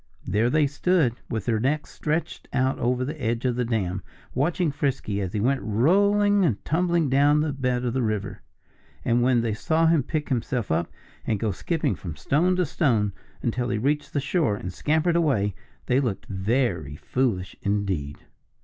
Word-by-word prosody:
There 110 Hz, +5 st, +2 dB
they 155 Hz, +2 st, +3 dB
stood, 145 Hz, -2 st, +2 dB, 0.2 s
with 110 Hz, -4 st, -3 dB
their 115 Hz, -3 st, +1 dB
necks 145 Hz, +6 st, -1 dB
stretched 160 Hz, +1 st, -3 dB
out 130 Hz, 0 st, +1 dB
over 125 Hz, +1 st, +1 dB
the 150 Hz, +2 st, -6 dB
edge 115 Hz, +1 st, -1 dB
of 125 Hz, -2 st, +1 dB
the 125 Hz, -, 0 dB
dam, 100 Hz, -5 st, -1 dB, 0.3 s
watching 160 Hz, +4 st, +1 dB
Frisky 135 Hz, -8 st, -1 dB
as 95 Hz, -2 st, -4 dB
he 105 Hz, -, 0 dB
went 130 Hz, +5 st, +1 dB
rolling 200 Hz, -, +3 dB
and 120 Hz, -, 0 dB
tumbling 170 Hz, 0 st, +1 dB
down 145 Hz, +3 st, +4 dB
to 155 Hz, -, 0 dB
the 145 Hz, -, -2 dB
bed 125 Hz, -2 st, -1 dB
of 120 Hz, -, -1 dB
the 130 Hz, -, 0 dB
river. 105 Hz, -3 st, -2 dB, 0.6 s
And 120 Hz, +1 st, +3 dB
when 125 Hz, -1 st, +3 dB
they 115 Hz, -2 st, -1 dB
saw 160 Hz, +9 st, +1 dB
him 165 Hz, -2 st, +4 dB
pick 150 Hz, +3 st, -3 dB
himself 120 Hz, -, -1 dB
up 80 Hz, +2 st, 0 dB, 0.4 s
and 110 Hz, -3 st, 0 dB
go 110 Hz, 0 st, 0 dB
skipping 160 Hz, -, -1 dB
from 80 Hz, -2 st, -7 dB
stone 155 Hz, -, +2 dB
to 180 Hz, -1 st, +1 dB
stone 115 Hz, -, +1 dB, 0.3 s
until 120 Hz, +1 st, -1 dB
he 115 Hz, -, 0 dB
reached 145 Hz, +6 st, -1 dB
the 145 Hz, -, +1 dB
shore 140 Hz, -, +1 dB
and 95 Hz, -3 st, -6 dB
scampered 160 Hz, -, +1 dB
away, 130 Hz, -, +2 dB, 0.3 s
they 125 Hz, -, +2 dB
looked 120 Hz, -8 st, -2 dB
very 95 Hz, -, -1 dB
foolish 95 Hz, -, -1 dB
indeed. 95 Hz, -8 st, -1 dB
125 Hz, 185 wpm, -25 LUFS, 105-150 Hz, 0.6 s, down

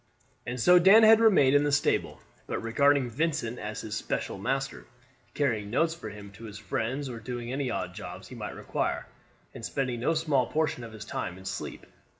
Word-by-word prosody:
And 125 Hz, +1 st, -3 dB
so 180 Hz, +9 st, +7 dB
Dan 195 Hz, +5 st, +7 dB
had 220 Hz, 0 st, +8 dB
remained 185 Hz, -12 st, +5 dB
in 145 Hz, -, +5 dB
the 145 Hz, -, +1 dB
stable, 140 Hz, -, +1 dB, 0.3 s
but -, -, -2 dB
regarding 140 Hz, +3 st, +2 dB
Vincent 130 Hz, -2 st, -2 dB
as 105 Hz, +1 st, -5 dB
his 105 Hz, -, -6 dB
special 100 Hz, -, -3 dB
master, 135 Hz, +5 st, -2 dB, 0.5 s
carrying 115 Hz, -8 st, 0 dB
notes 160 Hz, +8 st, +1 dB
for 140 Hz, -10 st, -8 dB
him 100 Hz, -1 st, -10 dB
to 115 Hz, +4 st, -12 dB
his 105 Hz, -2 st, -8 dB
friends, 130 Hz, +8 st, -3 dB
or 120 Hz, -3 st, -6 dB
doing 120 Hz, +1 st, -5 dB
any 135 Hz, -1 st, -1 dB
odd 90 Hz, -6 st, -3 dB
jobs -, -, -9 dB
he -, -, -10 dB
might -, -, -6 dB
require, -, -, -2 dB, 0.5 s
and -, -, -10 dB
spending 130 Hz, -4 st, -2 dB
no 165 Hz, +7 st, +1 dB
small 150 Hz, -6 st, +1 dB
portion 155 Hz, -6 st, -1 dB
of 115 Hz, -1 st, -9 dB
his 110 Hz, -1 st, -8 dB
time 90 Hz, 0 st, -4 dB
in 95 Hz, -, -13 dB
sleep. -, -, -5 dB
125 Hz, 195 wpm, -28 LUFS, 110-145 Hz, 0.5 s, had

